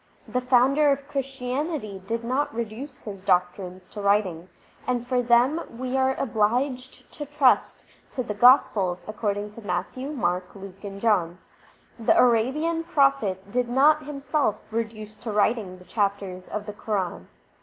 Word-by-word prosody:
The 250 - -1
Founder 265 +4 +4
of 275 0 -2
Christianity 265 - -3
did 230 +1 -2
not 260 +5 0
reduce 235 +4 -6
his 200 -3 -8
doctrines 180 0 0
to 210 - -7
writing, 195 -4 +1 0.4
and 245 -1 0
for 250 0 +1
them 245 +7 +3 0.2
we 255 +1 -3
are 265 0 +2
obliged 250 +3 -1
to 295 - -6
trust 290 -3 +2 0.2
to 255 - -3
the 210 - -4
Gospels 205 -6 +4
according 210 -1 -2
to 230 - -11
Matthew, 255 +5 -3
Mark, 180 -9 -2
Luke, 195 0 -11
and 200 -1 -7
John. 185 -6 +1 0.6
The 225 - +3
Arabian 265 +8 +2
Prophet 275 - +1
did 245 +1 0
not 300 +4 +4
himself 280 -4 0 0.2
reduce 220 -1 -4
to 225 +1 -5
writing 210 -2 +1
the 180 - -16
chapters 195 -3 -2
of 210 0 -4
the 210 - -6
Quran. 190 - -3
230 Hz, 145 wpm, -25 LUFS, 200-265 Hz, 0.6 s, Founder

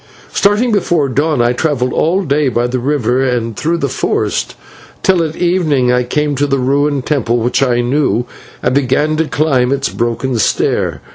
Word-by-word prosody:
"Starting 210 +5 +2
before 175 -8 +1
the 130 - -6
dawn 145 -2 +1
I 120 +1 +2
travelled 130 -2 -1
all 185 +5 +1
day 145 -3 +1
by 120 0 0
the 125 +1 -2
river 130 -2 0
and 120 -4 -1
through 165 +8 -1
the 140 - -1
forest, - - -2 0.5
till 185 -2 +3
at 160 -1 -4
evening 160 -8 +1
I 125 0 +2
came 150 +4 -1
to 145 +2 +1
the 135 -1 +1
ruined 140 +1 0
temple 120 -5 0
which 120 +3 0
I 125 -3 +2
knew, 125 -1 0 0.4
and - - +1
began 140 +3 +1
to 160 - +1
climb 135 -5 +1
its 140 0 0
broken 120 +1 -2
stair. - - 0
140 Hz, 185 wpm, -14 LUFS, 125-155 Hz, 0.5 s, till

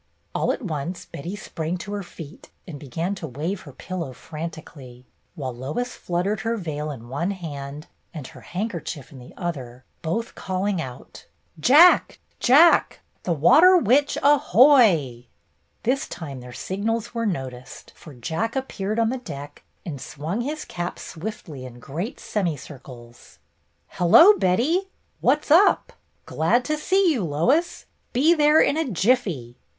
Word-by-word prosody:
All - - +1
at - - -5
once 170 -1 -4
Betty 170 +8 -7
sprang 170 -3 -4
to 200 +3 -8
her 205 - -3
feet 165 -4 -11 0.2
and 155 -5 -8
began 165 +8 -3
to 185 -5 -6
wave 155 +9 -4
her 145 - -12
pillow 165 -1 -6
frantically, 150 -4 -9 0.3
while 130 -6 -4
Lois 150 - -4
fluttered 180 +4 -2
her 225 +3 -2
veil 155 -5 -4
in 120 -5 -8
one 145 +9 -2
hand 150 -5 -6 0.3
and 155 -5 -8
her - - -12
handkerchief 175 - -5
in 135 - -12
the 125 - -13
other, 130 -9 -5 0.2
both 200 +9 -3
calling 190 -1 -2
out: 125 -4 -10 0.3
"Jack! 300 - +6 0.2
Jack! 305 +7 +5 0.2
The 180 - 0
Water 315 - +6
Witch 285 - +2
aho 285 -3 +3
o - - +12
o 285 - +7
y!^^ 145 - +3 0.6
This 265 +4 0
time 140 -6 -7
their 125 0 -10
signals 220 - -3
were 230 -1 -1
noticed, 130 -8 -6
for 150 -4 -13
Jack 165 - -3
appeared 215 -6 -3
on 230 -1 +2
the 260 - -3
deck 145 - -9 0.2
and 145 -6 -6
swung 155 +10 -4
his 300 +5 -4
cap 175 0 -5
swiftly 160 -6 -7
in 125 -1 -10
great 165 - -5
semicircles. 135 - -6 0.5
"Hello, 325 - +7
Betty! 290 - +1 0.3
What's 300 0 +1
up? 350 +6 +5 0.3
Glad 235 +11 +1
to 305 - 0
see 375 +3 +2
you, 235 -8 -2
Lois. 210 - 0 0.3
Be 295 +7 +4
there 300 -1 +5
in 290 - +3
a 320 -4 -1
jiffy." 185 - 0
175 Hz, 150 wpm, -23 LUFS, 145-235 Hz, 0.6 s, o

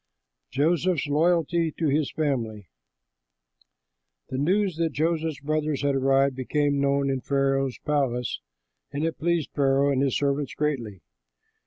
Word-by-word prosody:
JOSEPH'S 165 +4 +1
LOYALTY 165 +1 +2
TO 165 - 0
HIS 145 +1 +1
FAMILY 115 - -2 1.6
The 130 - -3
news 185 +3 +1
that 165 -3 0
Joseph's 160 -1 -1
brothers 150 -1 -1
had 140 -1 +2
arrived 135 0 +2
became 140 +2 0
known 140 0 +2
in 135 -1 -2
Pharaoh's 135 -1 0
palace; 130 -5 0 0.5
and 145 +3 -2
it 165 - -3
pleased 170 -2 0
Pharaoh 140 0 +2
and 135 -1 +1
his 135 -3 +1
servants 140 -1 -1
greatly. 120 - -2
140 Hz, 130 wpm, -25 LUFS, 135-155 Hz, 1.6 s, LOYALTY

